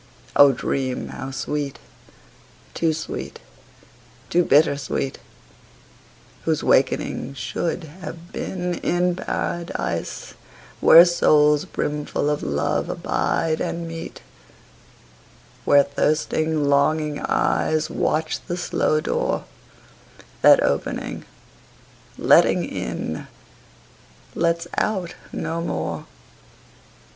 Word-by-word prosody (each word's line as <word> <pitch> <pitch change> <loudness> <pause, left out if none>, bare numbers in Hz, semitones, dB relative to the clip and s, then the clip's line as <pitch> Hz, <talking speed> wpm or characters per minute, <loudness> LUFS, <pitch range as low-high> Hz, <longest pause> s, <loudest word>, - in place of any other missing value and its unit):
O 140 -1 +8
dream 130 0 -2
how 135 - -6
sweet, 140 +1 -3 1.0
too 165 -1 +1
sweet, 160 +1 -5 0.9
too 175 +1 +4
bitter 150 -1 +4
sweet, 135 0 -3 1.2
Whose - - 0
wakening 135 - +1
should 165 +8 -3
have 170 +2 -10
been 180 -1 -3
in 175 0 +1
Paradise, 170 -2 -3 0.5
Where 170 +2 +9
souls 150 -4 +4
brimful 150 0 -2
of 150 - -2
love 75 0 -1
abide 160 -1 -1
and 170 0 -3
meet; 165 0 -8 1.4
Where 145 0 +6
thirsting 155 +1 0
longing 150 +1 +2
eyes 155 0 +1
Watch 155 0 -1
the 175 - -3
slow 155 -3 0
door 485 - -1 1.0
That - - +7
opening, - - -2 0.9
letting - - +4
in, - - -5 1.1
lets 170 0 0
out 190 -5 -1 0.2
no 165 +1 -3
more. 170 - -3
155 Hz, 90 wpm, -22 LUFS, 145-170 Hz, 1.4 s, Where